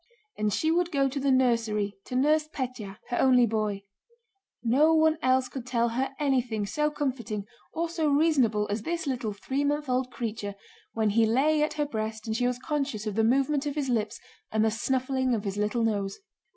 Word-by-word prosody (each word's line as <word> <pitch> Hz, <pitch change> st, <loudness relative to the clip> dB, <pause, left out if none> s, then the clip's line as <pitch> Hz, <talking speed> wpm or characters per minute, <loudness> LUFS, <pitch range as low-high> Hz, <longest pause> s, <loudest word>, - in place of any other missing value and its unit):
And 210 Hz, 0 st, 0 dB
she 315 Hz, +10 st, +1 dB
would 345 Hz, +1 st, +1 dB
go 275 Hz, -2 st, +2 dB
to 275 Hz, +1 st, -3 dB
the 275 Hz, 0 st, +1 dB
nursery 230 Hz, -6 st, +2 dB
to 250 Hz, -, -6 dB
nurse 305 Hz, +4 st, +3 dB
Pétya, 250 Hz, -9 st, -5 dB
her 245 Hz, -, -1 dB
only 250 Hz, -2 st, +5 dB
boy. 210 Hz, -3 st, -1 dB, 0.8 s
No 290 Hz, +7 st, +4 dB
one 315 Hz, 0 st, +3 dB
else 255 Hz, 0 st, +3 dB
could 250 Hz, 0 st, -7 dB
tell 235 Hz, -2 st, +1 dB
her 265 Hz, +4 st, -2 dB
anything 250 Hz, -7 st, 0 dB
so 300 Hz, +8 st, 0 dB
comforting 255 Hz, -9 st, -3 dB, 0.3 s
or 335 Hz, +1 st, -1 dB
so 325 Hz, -2 st, -1 dB
reasonable 275 Hz, -9 st, +3 dB
as 205 Hz, +1 st, -1 dB
this 335 Hz, +7 st, -3 dB
little 245 Hz, -6 st, -2 dB
three 265 Hz, +7 st, -2 dB
month 295 Hz, +1 st, 0 dB
old 255 Hz, 0 st, 0 dB
creature 215 Hz, -5 st, -4 dB, 0.4 s
when 220 Hz, -2 st, +1 dB
he 225 Hz, +1 st, +3 dB
lay 295 Hz, +7 st, +3 dB
at 305 Hz, -, +1 dB
her 295 Hz, -1 st, -1 dB
breast 220 Hz, -4 st, -4 dB
and 220 Hz, -1 st, -2 dB
she 245 Hz, +1 st, +1 dB
was 250 Hz, -1 st, -1 dB
conscious 275 Hz, -5 st, -3 dB
of 215 Hz, -, -2 dB
the 225 Hz, +2 st, +1 dB
movement 275 Hz, +5 st, +2 dB
of 290 Hz, -, -3 dB
his 285 Hz, -3 st, -1 dB
lips 220 Hz, -3 st, -1 dB, 0.3 s
and 220 Hz, 0 st, +2 dB
the 220 Hz, -, +2 dB
snuffling 260 Hz, +2 st, 0 dB
of 210 Hz, -, -3 dB
his 200 Hz, -1 st, -3 dB
little 210 Hz, +3 st, 0 dB
nose. 200 Hz, -3 st, -1 dB
250 Hz, 200 wpm, -27 LUFS, 220-285 Hz, 0.8 s, only